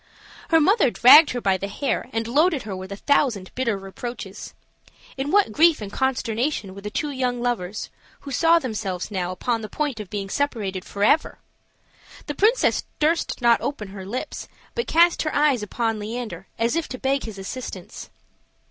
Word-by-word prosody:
Her 325 - +5
mother 375 - +4
dragged 290 +7 +8
her 245 - -3
by 195 -3 +2
the 200 - -4
hair 250 +3 -2
and 225 -1 -2
loaded 300 +3 +2
her 205 -2 -5
with 185 +1 -8
a - - -3
thousand 235 -8 +1
bitter 235 -5 -1
reproaches. 195 +1 -8 0.6
In 270 +1 -3
what 405 - +3
grief 325 +6 +4
and 210 -2 -7
consternation 245 -4 -1
were 200 - -10
the 210 - -5
two 295 +7 -2
young 250 -2 -1
lovers, 215 -5 -3 0.3
who 280 - -8
saw 330 +5 +4
themselves 215 - -3
now 180 -3 -2
upon 225 +5 -2
the 215 - -7
point 285 -1 -2
of 210 -3 -7
being 200 -2 -4
separated 200 -7 -2
forever! 205 +10 +1 0.9
The 295 - -4
princess 435 - +2
durst 310 -4 0
not 235 -1 +5
open 220 -9 -4
her 195 -1 -8
lips, 220 +7 -5 0.3
but 470 - -2
cast 340 +1 +4
her 310 - -2
eyes 290 -5 +3
upon 225 +1 -2
Leander, 225 +2 -6
as 230 +5 +1
if 335 -1 -1
to 255 - -6
beg 270 +2 0
his 220 -3 -7
assistance. 215 +6 -7
240 Hz, 175 wpm, -23 LUFS, 205-290 Hz, 0.9 s, dragged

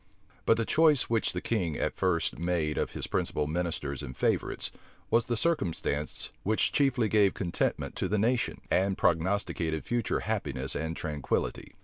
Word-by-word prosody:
But 115 - +5
the 115 - 0
choice 155 -5 +4
which 115 -3 +2
the 90 - -3
king 90 -10 -1
at - - -1
first 90 -3 0
made 85 -3 0
of - - -2
his - - -3
principal 75 - -1
ministers 75 -4 -2
and 65 - -7
favorites, - - 0 0.4
was 115 0 +4
the 120 - -1
circumstance 90 - -1
which 110 +2 +1
chiefly 135 -5 +2
gave 105 -2 +3
contentment 90 -4 -1
to - - 0
the 105 - +1
nation, 120 +4 +1
and 95 +1 +2
prognosticated 85 -2 0
future 120 -1 0
happiness - - -2
and 80 0 -3
tranquillity. 75 -3 -2
95 Hz, 155 wpm, -29 LUFS, 80-115 Hz, 0.4 s, But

